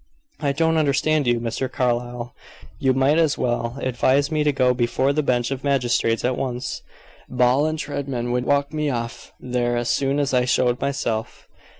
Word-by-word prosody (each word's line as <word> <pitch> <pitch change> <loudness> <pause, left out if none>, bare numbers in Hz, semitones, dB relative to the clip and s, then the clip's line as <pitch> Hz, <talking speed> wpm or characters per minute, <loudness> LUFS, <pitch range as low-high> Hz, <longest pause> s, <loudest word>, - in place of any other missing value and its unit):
"I 145 -3 0
don't 160 +3 +1
understand 150 -1 +2
you, 120 -1 +2
Mr. 120 +2 -3
Carlyle. 120 -2 -2 0.5
You 135 - +2
might 135 +4 +3
as 160 -3 +2
well 120 0 -1
advise 130 +3 +1
me 155 -1 +1
to 150 - +3
go 130 -2 +2
before 125 +3 +1
the 150 - +1
bench 125 -3 0
of 135 -1 -4
magistrates 120 -5 +1
at 125 0 +1
once. 125 -1 -3 0.5
Ball 125 +5 +2
& - - -3
Treadman 140 -5 -3
would 125 0 0
walk 140 +2 +1
me 150 -1 -1
off 115 -2 -5
there 120 -1 -1
as 120 0 0
soon 135 0 0
as 140 -2 0
I 125 -1 +3
showed 125 0 +1
myself." 130 -5 -3
130 Hz, 180 wpm, -22 LUFS, 120-140 Hz, 0.5 s, might